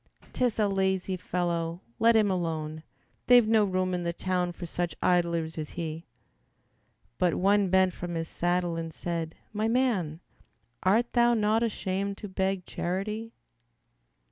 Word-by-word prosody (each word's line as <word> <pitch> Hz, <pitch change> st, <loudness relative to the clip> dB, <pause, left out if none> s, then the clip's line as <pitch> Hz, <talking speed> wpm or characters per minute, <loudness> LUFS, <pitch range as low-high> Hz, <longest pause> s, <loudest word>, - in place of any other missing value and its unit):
"'T 255 Hz, -, +1 dB
is 240 Hz, -, 0 dB
a 210 Hz, -2 st, +3 dB
lazy 190 Hz, -1 st, 0 dB
fellow, 170 Hz, -2 st, -2 dB, 0.2 s
let 230 Hz, 0 st, +5 dB
him 210 Hz, -3 st, +4 dB
alone, 160 Hz, -3 st, -2 dB, 0.5 s
They've 245 Hz, -3 st, +7 dB
no 220 Hz, -1 st, +4 dB
room 185 Hz, -2 st, 0 dB
in 180 Hz, -, -1 dB
the 170 Hz, 0 st, -1 dB
town 180 Hz, 0 st, -1 dB
for 175 Hz, +1 st, -7 dB
such 170 Hz, -1 st, -3 dB
idlers 170 Hz, -2 st, +1 dB
as 155 Hz, -, -4 dB
he." 165 Hz, -1 st, -4 dB, 1.1 s
But 180 Hz, -2 st, +2 dB
one 200 Hz, 0 st, +3 dB
bent 190 Hz, 0 st, +4 dB
from 175 Hz, 0 st, -5 dB
his 165 Hz, 0 st, -2 dB
saddle 175 Hz, 0 st, 0 dB
and 165 Hz, -1 st, -4 dB
said, 165 Hz, -1 st, -4 dB, 0.2 s
"My 215 Hz, +1 st, 0 dB
man, 225 Hz, -11 st, +1 dB, 0.6 s
Art 225 Hz, +6 st, +2 dB
thou 240 Hz, -1 st, +4 dB
not 215 Hz, +1 st, +2 dB
ashamed 200 Hz, -3 st, -2 dB
to 210 Hz, -, -7 dB
beg 190 Hz, -1 st, -1 dB
charity! 210 Hz, +6 st, -3 dB
185 Hz, 150 wpm, -28 LUFS, 170-210 Hz, 1.1 s, They've